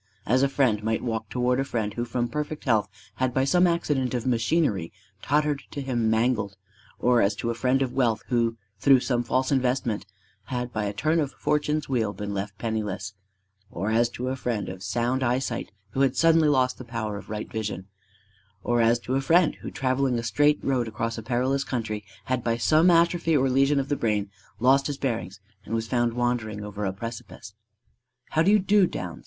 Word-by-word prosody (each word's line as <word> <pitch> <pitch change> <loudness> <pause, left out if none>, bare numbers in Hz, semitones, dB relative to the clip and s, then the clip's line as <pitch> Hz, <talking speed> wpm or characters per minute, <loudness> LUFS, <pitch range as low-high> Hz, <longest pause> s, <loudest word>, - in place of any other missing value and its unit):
As 130 +4 +3
a 140 - +3
friend 120 -7 +1
might 110 0 -1
walk 110 -2 -3
toward 125 0 +1
a - - +2
friend 110 -6 -2
who 120 +2 -2
from 120 0 -1
perfect 150 +4 -4
health 110 -6 +2 0.3
had 130 -1 0
by 130 - +3
some 180 +6 +4
accident 145 -7 0
of 120 - -2
machinery 115 - +1 0.3
tottered 150 0 +1
to 145 - -6
him 120 -5 0
mangled; 110 -3 +1 0.4
or 125 -1 +3
as 100 +1 +2
to 115 +3 -2
a - - -1
friend 130 +3 +1
of 125 - -4
wealth 120 -5 +1
who 115 -2 +1 0.2
through 135 +2 +5
some 120 -2 0
false 130 +3 0
investment 125 -6 0 0.4
had 125 -2 -4
by 105 -1 -1
a 100 - -1
turn 155 +10 +1
of 145 -3 -1
fortune's 150 0 0
wheel 115 -6 0
been 105 -1 -5
left 100 0 -4
penniless; 105 -3 -3 0.6
or 100 +5 -3
as 115 +1 +3
to 125 +1 -4
a 130 - -1
friend 120 -5 -3
of 95 0 -8
sound 120 +6 -1
eyesight 125 -2 -1 0.2
who 135 - -1
had 135 -2 +2
suddenly 165 0 +5
lost 130 -3 +2
the - - -6
power 110 -3 -4
of - - -11
right 105 0 -5
vision; 105 -4 -4 0.8
or 120 0 +2
as 115 +1 +4
to 120 +2 -5
a 135 - +2
friend 165 +3 +4
who - - -5
travelling 130 -1 0
a 115 - -3
straight 145 +7 +3
road 125 -4 0
across 115 +1 -3
a 110 - -5
perilous 130 +4 0
country 110 -5 -3 0.2
had 130 -2 -1
by 115 -1 0
some 155 +8 +4
atrophy 170 -1 +3
or 135 -1 +2
lesion 135 +2 +3
of 135 - -2
the 145 - 0
brain 105 -5 -1 0.3
lost 135 +3 +4
his 145 -2 -3
bearings 105 -8 -3 0.2
and 110 - -4
was 115 0 -1
found 120 -1 +1
wandering 120 -4 -1
over 105 0 -4
a 95 - 0
precipice. 110 0 -8 0.8
"How 160 - +2
do 170 - +4
you 210 - +6
do, 200 -1 +4
Downs?" 90 - -6
120 Hz, 205 wpm, -26 LUFS, 110-135 Hz, 0.8 s, you